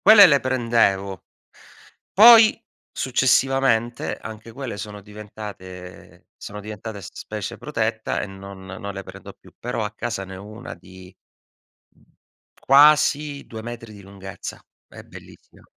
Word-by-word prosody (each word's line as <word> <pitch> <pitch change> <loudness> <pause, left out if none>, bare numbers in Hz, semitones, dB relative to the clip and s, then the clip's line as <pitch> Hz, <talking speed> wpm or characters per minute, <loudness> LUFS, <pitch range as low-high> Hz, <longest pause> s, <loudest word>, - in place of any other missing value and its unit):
Quelle 210 -3 +9
le 140 -4 +4
prendevo. 115 -7 0 0.9
Poi 225 +2 +8 0.3
successivamente 130 -2 +1
anche 110 +1 -10
quelle 130 -4 -6
sono 105 0 -7
diventate 100 -3 -11
sono 105 0 -8
diventate 105 0 -8
s 90 - -9
specie 105 -2 -6
protetta 110 -6 -2
e - - -3
non 95 0 -11
non 100 +1 -7
le 100 - -6
prendo 95 0 -11
più. - - -20
Però 120 -2 -3
a 105 - -5
casa 105 -4 -4
ne 95 0 -9
ho 95 - -10
una 110 +3 -9
di, 95 +1 -15 0.8
mhmm, - - -27 0.6
quasi 145 0 +4
2 110 -1 -8
metri 115 -2 -8
di 100 - -13
lunghezza. 95 0 -9 0.3
È - - -12
bellissima. - - -16
110 Hz, 135 wpm, -22 LUFS, 100-130 Hz, 0.9 s, Quelle